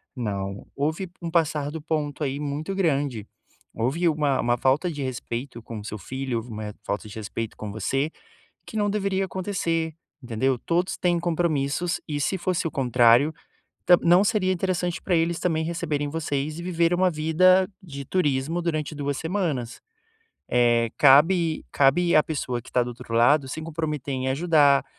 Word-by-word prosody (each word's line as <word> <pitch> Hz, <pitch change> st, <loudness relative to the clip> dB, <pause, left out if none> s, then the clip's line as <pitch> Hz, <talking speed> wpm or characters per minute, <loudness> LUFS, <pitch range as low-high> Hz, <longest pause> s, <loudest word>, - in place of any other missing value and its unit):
Não, 100 Hz, -5 st, -4 dB
houve 160 Hz, +6 st, -2 dB
um 170 Hz, -, -3 dB
passar 155 Hz, -3 st, +1 dB
do 160 Hz, +1 st, -6 dB
ponto 150 Hz, -1 st, -2 dB
aí 140 Hz, +1 st, -2 dB
muito 150 Hz, +5 st, -3 dB
grande. 140 Hz, -, 0 dB, 0.5 s
Houve 135 Hz, +10 st, +1 dB
uma 150 Hz, -3 st, +1 dB
uma 120 Hz, 0 st, +2 dB
falta 135 Hz, +8 st, +2 dB
de 145 Hz, -4 st, -4 dB
respeito 120 Hz, -1 st, -5 dB
com 115 Hz, 0 st, -8 dB
o -, -, -9 dB
seu 110 Hz, -, -5 dB
filho, 130 Hz, +3 st, -4 dB
houve 115 Hz, +2 st, -6 dB
uma 105 Hz, -1 st, -6 dB
falta 105 Hz, +2 st, -3 dB
de -, -, -10 dB
respeito 110 Hz, +1 st, -5 dB
com 105 Hz, -, -6 dB
você 135 Hz, +8 st, -1 dB, 0.6 s
que -, -, -8 dB
não 205 Hz, -1 st, +1 dB
deveria 195 Hz, -2 st, 0 dB
acontecer, 170 Hz, -4 st, -2 dB, 0.3 s
entendeu? 125 Hz, +2 st, 0 dB
Todos 175 Hz, +7 st, -1 dB
têm 175 Hz, -1 st, +1 dB
compromissos 170 Hz, 0 st, 0 dB
e 145 Hz, -1 st, -2 dB
se 190 Hz, -, 0 dB
fosse 185 Hz, -1 st, -1 dB
o 165 Hz, -, -1 dB
contrário, 125 Hz, 0 st, +4 dB, 0.5 s
ta 175 Hz, -, +7 dB
não 175 Hz, +3 st, +5 dB
seria 205 Hz, -3 st, +1 dB
interessante 180 Hz, -1 st, -1 dB
pra 185 Hz, -, -1 dB
eles 165 Hz, +1 st, +1 dB
também 160 Hz, -3 st, 0 dB
receberem 155 Hz, -3 st, -2 dB
vocês 150 Hz, -1 st, -2 dB
e 170 Hz, -, -6 dB
viver 170 Hz, -1 st, +1 dB
uma 180 Hz, +1 st, +3 dB
vida 185 Hz, +4 st, +4 dB, 0.2 s
de 140 Hz, -5 st, -8 dB
turismo 150 Hz, 0 st, 0 dB
durante 155 Hz, -3 st, -2 dB
2 145 Hz, -1 st, -2 dB
semanas. 160 Hz, -, -2 dB, 0.7 s
Eh, 120 Hz, -1 st, +3 dB
cabe 160 Hz, +4 st, +5 dB
cabe 170 Hz, +6 st, +3 dB
à 155 Hz, -, +7 dB
pessoa 130 Hz, -6 st, -3 dB
que -, -, -14 dB
tá 125 Hz, -, +2 dB
do 120 Hz, -, -4 dB
outro 115 Hz, -1 st, -7 dB
lado 135 Hz, +4 st, +4 dB
se 160 Hz, +4 st, -5 dB
comprometer 155 Hz, -3 st, -3 dB
em 130 Hz, 0 st, -2 dB
ajudar, 145 Hz, -1 st, +4 dB
150 Hz, 170 wpm, -25 LUFS, 130-170 Hz, 0.7 s, ta